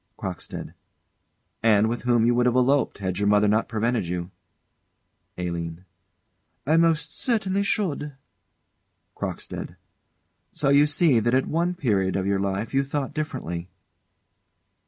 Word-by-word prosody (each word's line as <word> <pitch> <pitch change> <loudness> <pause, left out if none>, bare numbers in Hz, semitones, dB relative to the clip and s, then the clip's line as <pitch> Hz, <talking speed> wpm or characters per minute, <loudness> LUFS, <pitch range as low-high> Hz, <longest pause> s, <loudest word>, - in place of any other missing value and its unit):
CROCKSTEAD. - - -6 0.9
And 110 -1 +4
with 120 +1 -2
whom 120 -2 +3
you 120 - +4
would 120 +1 +3
have 125 - +2
eloped, 135 +2 +2
had 95 -2 -3
your 100 - +1
mother 105 0 +4
not 110 +2 +1
prevented 115 -3 0
you. 90 +1 -4 1.1
ALINE. 85 0 -4 0.8
I 155 +4 +3
most 165 -1 +2
certainly 200 -5 0
should. 165 -8 -1 1.0
CROCKSTEAD. - - -5 0.8
So 145 - 0
you 140 +1 +5
see 145 -4 +3
that 120 +3 +1
at 130 - +2
one 175 +3 0
period 100 - 0
of 95 - -1
your 100 0 +1
life 100 +4 -2
you 135 +1 +3
thought 140 0 -3
differently. 110 - -4
120 Hz, 135 wpm, -25 LUFS, 100-145 Hz, 1.1 s, you